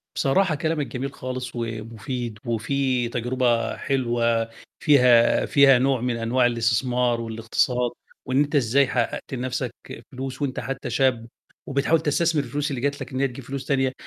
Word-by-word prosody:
بصراحة 160 +5 +2
كلامك 155 -1 -1
جميل 135 +2 -5
خالص، 125 -1 -5
ومفيد 115 0 -5
وفيه 125 +1 0
تجربة 120 0 0
حلوة 120 -3 0 0.3
فيها 125 -5 +5
فيها 135 -3 +6
نوع 130 -1 +1
من 125 0 -1
أنواع 120 +2 +2
الاستثمار 120 +1 +1
والإقتصاد، 115 +2 0 0.4
وإن 130 +2 +2
أنت 145 +1 +1
إزاي 135 +2 +3
حقَّقت 125 +2 -2
لنفْسك 125 -1 -3 0.4
فلوس 135 +2 -6
وأنت 135 -3 -2
حتى 135 0 -5
شاب 125 -4 +1 0.4
وبتحاول 140 +4 +2
تستثمر 160 0 +1
الفلوس 145 +4 -3
اللي 135 -3 -3
جَت 140 +2 -1
لك - - -7
إن 130 - -2
هي 140 - +2
تجيب 125 +1 -10
فلوس 135 +1 -5
تانية، 135 -2 +1
125 Hz, 150 wpm, -24 LUFS, 120-140 Hz, 0.4 s, فيها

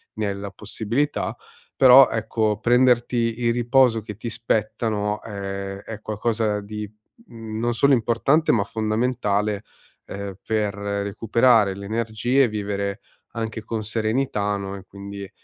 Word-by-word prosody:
ne 110 -1 -1
hai 100 - -2
la 100 0 -6
possibilità. 115 +9 -2 0.4
Però 130 +1 +8
ecco 110 -1 -1
prenderti 120 -1 +2
il 115 0 +3
riposo 120 -1 +3
che 105 -1 -9
ti 115 +1 -5
spetta 115 0 -1
no, 105 0 -2
è 100 -2 -5
è 110 -2 -8
qualcosa 110 0 -1
di 105 0 -6 0.4
non 115 +1 -3
solo 140 +4 +4
importante 125 +6 +2
ma 110 - +2
fondamentale, 110 -2 -1 0.4
ehm, 100 -1 -6
per 105 -2 0
recuperare 100 +2 +2
le 100 0 -8
energie 115 +4 +1
e 125 - +3
vivere 100 0 -3 0.3
anche 110 -1 -4
con 110 -1 -3
serenità 110 -1 -1
no 100 0 -5
e 95 - -11
quindi 100 0 -8
110 Hz, 135 wpm, -23 LUFS, 100-115 Hz, 0.4 s, Però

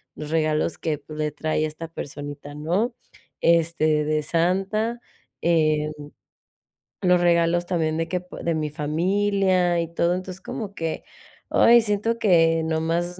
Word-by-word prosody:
los 150 0 -7
regalos 155 0 +1
que 150 -3 -3
le 150 0 -2
trae 155 +1 -1
esta 155 +2 -6
personita, 145 -1 -7
¿no? 180 +11 0 0.5
Este, 160 -2 +3
de 155 0 0
Santa, 195 +8 0 0.4
eh, 155 -2 +2 1.1
los 180 -1 +4
regalos 170 0 +3
también 160 -3 0
de 165 0 -1
que 180 - -1
pu 180 - -12
de 170 -1 0
mi 155 -1 -2
familia 180 +3 +1
y 165 - -5
todo, 170 +1 +2
entonces, 185 0 -6
como 200 0 -6
que, 165 -1 -3 0.5
ay, 235 0 +6
siento 215 +2 0
que 165 -6 +4
nomás 165 +3 -1
165 Hz, 135 wpm, -24 LUFS, 155-185 Hz, 1.1 s, ay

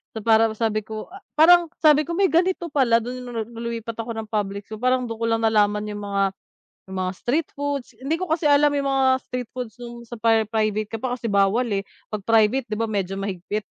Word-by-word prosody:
So, 220 - -4
parang 225 -1 +4
sabi 215 -1 0
ko 220 +5 -7
a 390 - -10 0.2
parang 345 +1 +7
sabi 305 -1 +6
ko, 340 - -3
"May 390 -1 +4
ganito 350 +1 +1
pala", 255 -5 +4
do'n 250 +1 -5
'no 245 - -8
'no, 225 - -2
no'ng 230 0 -8
lumipat 230 -1 -5
ako 230 +1 -3
ng 220 -1 -5
public, 200 -1 -2
so, 215 - -7
parang 255 0 +1
do'n 225 - -5
ko 230 - -1
lang 225 0 +1
nalaman 210 -1 +3
yung 205 0 -6
mga, 200 0 0 0.7
yung 190 - -5
mga 185 0 -2
street 295 +6 -1
foods, 285 -3 -3
hindi 275 +4 -2
ko 365 -2 -4
kasi 320 -1 0
alam 290 +1 +5
yung 280 -1 0
mga 270 -1 +2 0.2
street 250 -2 -5
foods 250 -3 -5
no'ng 235 0 -8
sa 240 - -7
pri 225 -1 +3
private 215 -1 0
ka 225 - -3
pa, 255 -1 -1
kasi 240 - -10
bawal, 200 +5 +3
eh, 195 - 0 0.3
'pag 210 - -2
private, 225 +3 +3
'di 215 - -2
ba, 230 - +1
medyo 195 -2 -2
mahigpit. 195 +2 -3
230 Hz, 235 wpm, -23 LUFS, 215-270 Hz, 0.7 s, parang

